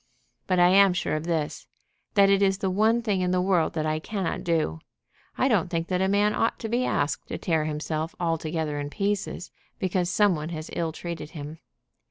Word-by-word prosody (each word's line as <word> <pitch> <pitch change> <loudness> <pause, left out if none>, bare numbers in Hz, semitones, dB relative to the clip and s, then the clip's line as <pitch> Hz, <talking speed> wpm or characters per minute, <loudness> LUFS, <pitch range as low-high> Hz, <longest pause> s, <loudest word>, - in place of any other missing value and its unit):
But 185 - +2
I 175 0 +6
am 195 0 +6
sure 175 -3 -1
of 155 +1 -3
this, 160 -3 -2 0.5
that 200 -1 +6
it 195 0 +3
is 195 -1 +3
the 190 -1 -1
one 220 +5 +2
thing 200 -5 0
in 180 - +1
the 180 0 +2
world 180 -3 +2
that 155 -1 -1
I 155 0 0
cannot 185 0 -3
do. 160 - 0 0.6
I 260 - +3
don't 200 -9 +2
think 165 -1 -2
that 180 0 0
a 190 - +2
man 205 +2 +2
ought 225 - 0
to 225 - -4
be 240 +3 +1
asked 145 0 -1
to - - -4
tear 160 -3 0
himself 155 +3 -3
altogether 160 -3 -1
in 145 0 -4
pieces 200 0 -2 0.3
because 180 -1 0
some 205 -1 +3
one 155 +1 -5
has 155 -2 -6
ill 165 -1 -1
treated 165 -2 -6
him. 150 +2 -7
175 Hz, 210 wpm, -26 LUFS, 155-195 Hz, 0.6 s, I